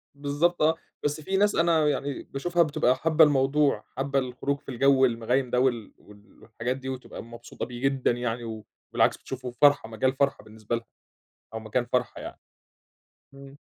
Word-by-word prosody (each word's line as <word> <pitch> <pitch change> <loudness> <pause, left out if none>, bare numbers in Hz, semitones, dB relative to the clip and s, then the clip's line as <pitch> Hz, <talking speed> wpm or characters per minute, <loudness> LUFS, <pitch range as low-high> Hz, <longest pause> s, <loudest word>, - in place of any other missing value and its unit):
بالضبط، 145 +5 0
آه، 160 +1 +4 0.3
بس 145 +1 -1
في 190 +5 -1
ناس 205 0 +3
أنا 165 -1 +3
و 150 - +3
يعني 140 -1 -2
باشوفها 175 +5 0
بتبقى 145 -4 +2
حابّة 160 +3 +4
الموضوع، 140 -4 +3
حابّة 135 +1 0
الخروج 135 +2 -3
في - - -14
الجوّ 135 +1 +4
المغيّم 125 +2 0
ده 125 - +1
وال 120 -5 0
وال 105 -1 -19
والحاجات 120 +3 -3
دي 130 0 -6
وتبقى 130 -3 -7
مبسوطة 120 +1 -8
بيه 120 0 -9
جدًا 135 -2 +1
يعني، 115 -2 -4 0.3
وبالعكس - - +3
بتشوفه 130 -1 -7
فرحَة، 145 -5 +5
مجال 120 +4 0
فرحَة 140 -4 0
بالنسبة 110 +1 -5
لها 115 0 -6 0.7
أو - - -2
مكان 110 +3 -1
فرحَة 125 -1 0
يعني. - - -9 0.9
إمم. 140 +1 -13
130 Hz, 170 wpm, -26 LUFS, 120-145 Hz, 0.9 s, فرحَة